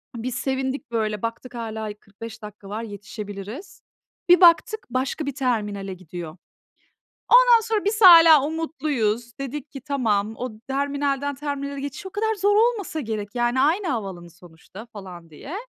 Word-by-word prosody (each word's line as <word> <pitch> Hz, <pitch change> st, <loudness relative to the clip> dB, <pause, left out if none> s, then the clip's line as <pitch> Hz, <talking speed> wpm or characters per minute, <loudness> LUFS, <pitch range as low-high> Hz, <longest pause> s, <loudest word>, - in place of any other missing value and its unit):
Biz 240 Hz, +2 st, -4 dB
sevindik, 265 Hz, 0 st, -3 dB
böyle, 215 Hz, -3 st, -1 dB
baktık 230 Hz, +2 st, -5 dB
hâlâ 220 Hz, -2 st, -5 dB
y -, -, -5 dB
45 220 Hz, +2 st, -11 dB
dakika 210 Hz, -1 st, -11 dB
var, 215 Hz, +2 st, -4 dB
yetişebiliriz. 205 Hz, -, -8 dB, 0.5 s
Bir 355 Hz, +1 st, +7 dB
baktık, 395 Hz, +6 st, +4 dB
başka 260 Hz, +5 st, -2 dB
bir 280 Hz, -1 st, -4 dB
terminale 210 Hz, -7 st, -2 dB
gidiyor. 175 Hz, -2 st, -9 dB, 0.9 s
Ondan -, -, +7 dB
sonra 440 Hz, -2 st, -2 dB
biz 430 Hz, +2 st, 0 dB
hâlâ 330 Hz, -5 st, +9 dB
umutluyuz. 280 Hz, -8 st, -2 dB
Dedik 275 Hz, +1 st, -6 dB
ki, 275 Hz, -, -8 dB
"Tamam, 225 Hz, -7 st, -1 dB
o 250 Hz, -, -4 dB, 0.2 s
terminalden 280 Hz, 0 st, -1 dB
terminale 280 Hz, -1 st, -4 dB
geçiş 285 Hz, +8 st, -6 dB
o -, -, -7 dB
kadar 440 Hz, +2 st, -1 dB
zor 405 Hz, +1 st, +2 dB
olmasa 430 Hz, -7 st, +1 dB
gerek. 215 Hz, -6 st, -4 dB
Yani 240 Hz, +2 st, +1 dB
aynı 340 Hz, +7 st, +2 dB
havaalanı 195 Hz, -9 st, -4 dB
sonuçta." 175 Hz, +6 st, -14 dB
falan 180 Hz, -5 st, -10 dB
diye. 270 Hz, -, -9 dB
255 Hz, 150 wpm, -23 LUFS, 210-305 Hz, 0.9 s, hâlâ